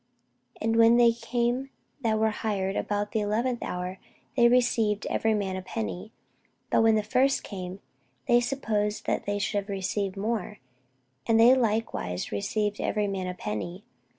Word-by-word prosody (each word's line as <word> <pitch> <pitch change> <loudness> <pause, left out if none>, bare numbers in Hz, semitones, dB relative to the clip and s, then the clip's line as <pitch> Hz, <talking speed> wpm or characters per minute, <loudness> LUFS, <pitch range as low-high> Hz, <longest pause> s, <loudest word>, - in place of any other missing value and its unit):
And 225 +1 0
when 230 +1 +6
they 240 -1 +6
came 240 +3 -1 0.3
that 220 -3 +1
were 220 0 +2
hired 200 -3 -2
about 205 0 -1
the 220 - 0
eleventh 230 +4 -1
hour, 180 +1 -4 0.4
they 240 -2 +6
received 235 -4 +2
every 220 -1 +1
man 195 -2 -2
a 185 - -4
penny. 100 - -5 0.6
But - - +4
when 225 -1 +5
the 215 - +1
first 260 +6 +2
came, 185 -1 -7 0.5
they 240 -1 +5
supposed 215 -5 -1
that - - -1
they 205 0 0
should 205 0 0
have 200 +1 -9
received 195 0 -2
more; 210 0 -2 0.7
and 225 0 +4
they 235 +3 +8
likewise 220 - -1
received 210 - -1
every 210 -1 0
man 195 -2 -3
a 180 - -4
penny. 175 - -5
210 Hz, 160 wpm, -27 LUFS, 195-230 Hz, 0.7 s, they